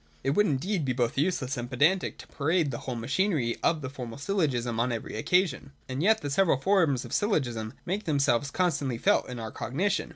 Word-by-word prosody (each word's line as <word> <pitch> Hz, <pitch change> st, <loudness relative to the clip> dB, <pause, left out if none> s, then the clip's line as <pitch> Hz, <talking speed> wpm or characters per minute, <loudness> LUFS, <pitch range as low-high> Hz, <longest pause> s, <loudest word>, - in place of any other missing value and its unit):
It 135 Hz, -, +1 dB
would 210 Hz, +8 st, +3 dB
indeed 165 Hz, +5 st, 0 dB
be 130 Hz, -2 st, 0 dB
both 120 Hz, -2 st, 0 dB
useless 140 Hz, -4 st, 0 dB
and 120 Hz, 0 st, -4 dB
pedantic 155 Hz, +9 st, +2 dB
to -, -, -12 dB
parade 160 Hz, 0 st, 0 dB
the 120 Hz, -, -4 dB
whole 125 Hz, -, -5 dB
machinery 135 Hz, -, 0 dB
of 165 Hz, -2 st, +1 dB
the 130 Hz, -, -4 dB
formal 125 Hz, -4 st, -7 dB
syllogism 140 Hz, -, -1 dB
on 120 Hz, +2 st, +1 dB
every 115 Hz, -2 st, -4 dB
occasion. 145 Hz, -, +1 dB
And 130 Hz, +2 st, -3 dB
yet 220 Hz, +5 st, +4 dB
the 145 Hz, -, -4 dB
several 170 Hz, -2 st, +3 dB
forms 160 Hz, -5 st, +2 dB
of -, -, -8 dB
syllogism 120 Hz, -, 0 dB
make 195 Hz, +4 st, -2 dB
themselves 140 Hz, -3 st, +2 dB
con 180 Hz, +2 st, +1 dB
stantly 130 Hz, -7 st, -3 dB
felt -, -, +2 dB
in 125 Hz, -, -6 dB
our 110 Hz, -2 st, -5 dB
cognition. 185 Hz, -, -1 dB
140 Hz, 205 wpm, -28 LUFS, 120-180 Hz, -, yet